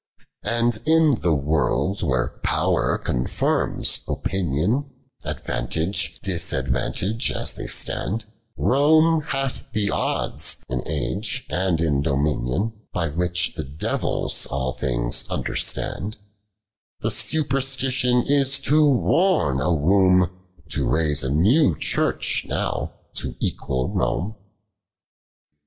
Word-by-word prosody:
And 115 -1 +1
in 160 -5 +4
the 85 -3 +2
world 75 +6 0
where 65 -1 -1
Pow'r - - +1
contirms 60 +1 0
Opinion, 95 - -1 0.4
Advantage, 85 +2 -1
disadvantage 95 - -1
as - - -1
they - - -6
stand; 110 +3 -2 0.3
Koine 155 +3 +4
hath 135 -1 -2
the 105 -2 +1
odds - - +1
in 65 0 -2
age 115 +5 -2
and 90 -2 +1
in 75 -4 +1
dominion; 70 - 0 0.2
By 85 -2 -1
which 90 +3 +2
the - - -4
devils 70 +3 -2
all 65 -2 -2
things - - 0
understand, 105 +3 -2 0.9
Tlie 110 - +1
superstition 135 -1 +1
is 140 -1 +3
too 150 +2 +3
worn 140 - +2
a 90 - +1
womb 90 +2 +4 0.4
To - - 0
raise 75 0 +1
a 65 - -1
new 95 - +3
Church - - 0
now - - -2 0.3
to - - -2
equal 65 -1 -2
Home. 105 +5 -1
95 Hz, 105 wpm, -23 LUFS, -, 0.9 s, in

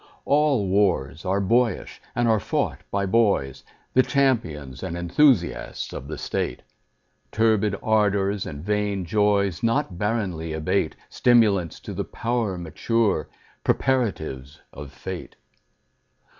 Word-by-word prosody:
All 145 -8 +3
wars 90 -5 +1
are 95 +2 +1
boyish, 115 +2 0
and 120 0 +2
are 110 -2 +3
fought - - -1
by 100 0 0
boys, 100 - +1 0.3
The 130 - +6
champions 100 - 0
and 85 - -4
enthusiasts 90 - +1
of - - -7
the - - -5
state: - - -3 0.7
Turbid 110 -2 +2
ardors 105 -2 +1
and 75 0 -7
vain 105 -2 -1
joys 100 -2 +1
Not 115 -6 0
barrenly 95 -7 -2
abate— 80 0 0
Stimulants 105 -9 +3
to - - -7
the - - -2
power 115 -5 -2
mature, 90 +2 0 0.3
Preparatives 80 - -1
of 70 -2 -9
fate. 60 -3 -7
100 Hz, 115 wpm, -24 LUFS, 85-115 Hz, 0.7 s, The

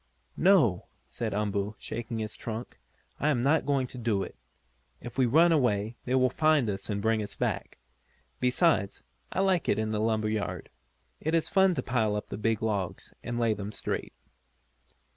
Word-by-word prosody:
"No," 160 - +4 0.2
said 110 - -4
Umboo, 105 0 -1
shaking 115 +1 -5
his 110 -2 -4
trunk, 115 +1 -6 0.4
"I 150 - +2
am 140 -5 +2
not 145 +6 +2
going 140 -2 +2
to 125 0 -9
do 110 -5 0
it. - - -8 0.6
If 120 -1 -9
we 130 -2 +3
run 165 +8 +5
away 115 -7 +1
they 125 - +1
will 130 -1 +3
find 155 -5 +3
us 95 +2 -6
and 100 -1 -2
bring 110 -1 +2
us 105 - -6
back. - - -2 0.6
Besides, 125 - +2 0.3
I - - 0
like 190 -3 +2
it - - +3
in 110 0 -1
the 105 - -1
lumber 110 -1 +1
yard. 110 -1 -3 0.5
It 160 +2 0
is 165 - +1
fun 190 -2 +4
to - - -2
pile 110 -5 +1
up 105 - -4
the - - -5
big 110 0 0
logs, 100 -5 -2
and 120 0 -4
lay 115 -2 +3
them 100 0 -5
straight." 110 - -4
115 Hz, 180 wpm, -29 LUFS, 105-135 Hz, 0.6 s, run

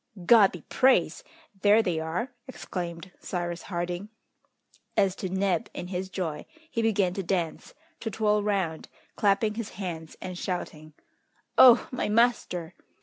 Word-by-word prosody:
"God 215 -1 +7
be 175 - -9
praised! 215 - +2 0.4
there 210 +3 +5
they 175 -5 -1
are!" 170 +10 -3 0.2
exclaimed 180 -7 -6
Cyrus 175 -1 -4
Harding. 175 +2 -4 0.9
As 190 -2 +3
to 185 - -4
Neb 190 -2 0
in 180 - -6
his 185 0 -3
joy, 165 -6 -4 0.2
he 230 - -1
began 205 -5 +2
to 195 - -3
dance, 175 -3 -3 0.2
to 225 - -3
twirl 210 0 +1
round, 195 -6 -1 0.3
clapping 205 +1 +2
his 225 -1 -5
hands 165 -5 -6
and 185 -1 -6
shouting, 155 -4 -5 0.6
"Oh! 245 -2 +8
my 250 - -2
master!" 215 -7 +1
190 Hz, 140 wpm, -27 LUFS, 175-210 Hz, 0.9 s, Oh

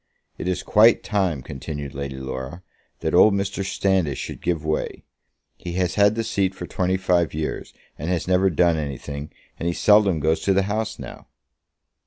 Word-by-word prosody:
"It - - -4
is 90 - -1
quite 110 +2 +5
time," 95 -10 0
continued 70 +1 -6
Lady 70 -1 -5
Laura, 65 +6 -6 0.4
"that - - -1
old 105 -2 +6
Mr. 100 0 -2
Standish 95 -7 0
should - - -6
give 80 -3 -1
way. 80 0 -2 0.5
He 85 - -6
has 90 0 0
had 100 +1 +4
the 115 - -1
seat 95 -3 0
for - - -6
twenty 95 +1 0
five 90 -4 +1
years, 80 0 -4 0.3
and 80 +4 -3
has 90 -2 -1
never 95 +1 +3
done 85 0 +3
anything, 70 0 -5 0.3
and 85 - -2
he 85 - -1
seldom 105 -5 +4
goes 80 +2 +1
to 95 - +1
the 100 - +3
House 105 +3 -2
now." - - -10
90 Hz, 180 wpm, -23 LUFS, 75-95 Hz, 0.5 s, old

